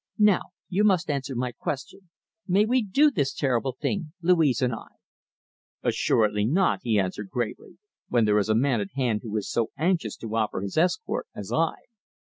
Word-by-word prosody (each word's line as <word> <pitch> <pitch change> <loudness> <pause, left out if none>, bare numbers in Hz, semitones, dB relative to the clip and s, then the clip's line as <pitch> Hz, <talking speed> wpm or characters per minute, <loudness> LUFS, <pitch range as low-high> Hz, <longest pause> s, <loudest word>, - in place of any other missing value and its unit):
Now 210 -4 +5 0.3
you 195 +3 +1
must 185 -6 +3
answer 135 -2 -3
my 125 +1 -1
question. 150 +9 -6 0.4
May 200 +3 +4
we 250 +3 +2
do 275 +9 +3
this 140 - -1
terrible 130 -2 0
thing, 165 -7 -2
Louise 165 -7 +3
and 125 -3 +1
I?" 115 - -7 1.0
"Assuredly 105 -2 +2
not," 185 +8 +2
he 110 -4 +1
answered 95 +1 -3
gravely, 120 - -4 0.3
"when 120 -2 +3
there 105 0 +3
is 105 - -1
a 110 - +3
man 125 -1 +2
at 100 - -6
hand 120 -6 +1
who 110 -2 -4
is 105 - -3
so 115 -1 0
anxious 170 +3 0
to 115 -1 -5
offer 110 -4 0
his 100 0 -5
escort 305 - 0
as - - -6
I." - - +1
135 Hz, 180 wpm, -26 LUFS, 110-180 Hz, 1.0 s, Now